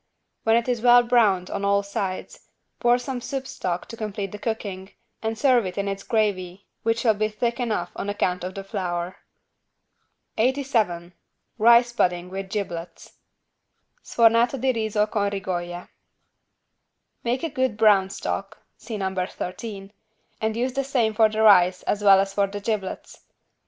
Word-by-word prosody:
When 225 0 +4
it 235 +1 +1
is 245 -3 -1
well 245 0 +7
browned 215 -7 +2
on 200 - -3
all 200 0 +2
sides, 195 -2 -5 0.3
pour 240 0 +4
some 250 0 -5
soup 270 +1 -4
stock 180 -7 -4
to 230 - -7
complete 210 -3 -4
the 210 - -8
cooking 200 -4 -5 0.3
and 225 0 -2
serve 250 -1 +4
it 180 - -7
in 200 0 -1
its 195 0 -3
gravy 200 -4 -1 0.2
which 230 0 0
will 225 -3 +4
be 215 +1 0
thick 235 +3 -2
enough 215 -8 -2
on 200 - -4
account 180 -3 -1
of 185 +1 -5
the 195 - -5
flour. 180 -3 -4 1.2
87 225 -9 0 0.5
RICE 235 +2 +6
PUDDING 180 -4 0
WITH 195 0 -5
GIBLETS 175 -4 -6 0.9
(Sfornato 235 +3 +3
di 260 +2 +2
riso 220 -2 0
con 205 -2 -1
rigoglie) 175 -3 -4 1.4
Make 245 +4 -1
a 330 - -1
good 260 -6 -1
brown 200 -3 +4
stock 200 +2 -4 0.2
(see 225 -3 -6
No. 190 -1 -2
13) 195 +2 -5 0.5
and 220 0 -1
use 250 +2 -1
the 275 - -1
same 245 -5 +1
for 220 0 +4
the 215 +1 0
rice 185 -3 +5
as 205 0 -1
well 195 -1 +7
as 195 0 -1
for 200 0 +2
the 205 +1 -6
giblets. 205 -2 -4
210 Hz, 160 wpm, -24 LUFS, 190-235 Hz, 1.4 s, well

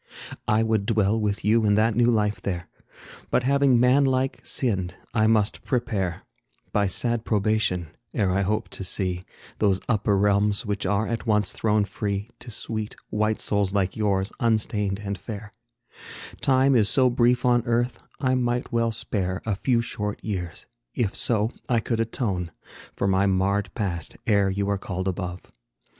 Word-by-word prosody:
I 110 +1 +3
would 110 -3 0
dwell 110 -1 +2
with 105 -1 -1
you 110 +2 +4
in 105 -1 +3
that 110 +2 +3
new 120 +2 +3
life 105 -3 +1
there, 90 -3 -3 0.6
But 125 - +2
having, 140 -1 +4
man 125 +3 +5
like, 130 0 +1
sinned, 95 -8 -1 0.2
I 110 -2 +3
must 110 -2 +1
prepare, 110 -9 -1 0.5
By 100 -1 +2
sad 120 +4 0
probation, 105 -6 0 0.2
ere 100 -4 +1
I 95 +2 +1
hope 105 +3 -1
to - - -5
see 90 -1 -2 0.3
Those 100 -3 +3
upper 105 -3 +2
realms 100 +2 +2
which 105 -2 -2
are 100 +3 +1
at 115 0 -3
once 105 -2 +2
thrown 105 -1 +1
free 100 +2 -3
To 125 - -10
sweet, 110 -1 -4 0.2
white 110 +1 0
souls 100 -1 +1
like 95 -2 +1
yours, 100 -1 0
unstained 105 -4 +1
and 100 -2 -4
fair 105 +1 -8 0.9
Time 135 +1 +4
is 105 -4 +4
so 130 -2 +4
brief 120 0 +2
on 120 -1 +4
earth, 120 0 0 0.2
I 130 -2 +1
well - - +2 0.5
might 115 - -2
spare 95 -5 -3
A 110 - 0
few 115 +3 +1
short 105 -2 -3
years, 90 -5 -4 0.3
if 110 -5 0
so 110 -1 +2 0.2
I 120 -2 +3
could 115 0 -2
atone 105 -6 -1 0.5
For 100 - 0
my 95 +1 +3
marred 95 +1 +1
past, 85 -6 -3
ere 100 -4 +3
you 100 +1 -1
are 100 -1 0
called 95 -1 -4
above. 90 -1 -3
105 Hz, 165 wpm, -25 LUFS, 100-115 Hz, 0.9 s, man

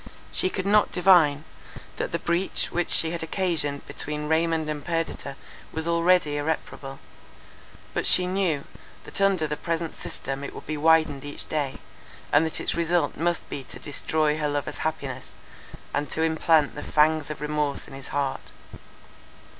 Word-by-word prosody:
She 185 - 0
could 185 0 -3
not 210 +1 +4
divine, 170 -6 +5 0.5
that - - -2
the - - 0
breach 175 +3 0
which 175 0 -1
she 160 - +4
had 170 - -3
occasioned 160 -4 -1
between 150 0 -3
Raymond 160 0 +1
and 150 -1 -4
Perdita 165 -4 -3 0.4
was 160 +1 -3
already 170 -3 +3
irreparable: 145 -2 -3 1.0
but - - +1
she 180 - +7
knew, 180 -6 0 0.4
that - - -4
under 195 -5 +3
the 150 0 -2
present 165 +1 -3
system 135 +1 -6
it - - -6
would - - -9
be 155 - -3
widened 155 -2 +3
each 145 0 -5
day, 145 -3 -2 0.6
and 145 - +6
that 160 - -3
its - - 0
result 170 -2 +1
must 170 +1 0
be 140 - -5
to - - -10
destroy 155 +1 0
her 150 -1 0
lover's 145 -1 -3
happiness, 140 -5 -4 0.6
and 145 -1 -1
to 160 - -1
implant 160 -2 +3
the 145 - -6
fangs 155 0 +2
of 150 - -5
remorse 150 -1 -1
in - - -12
his 135 -1 -8
heart. 140 -1 -3
155 Hz, 160 wpm, -26 LUFS, 145-170 Hz, 1.0 s, she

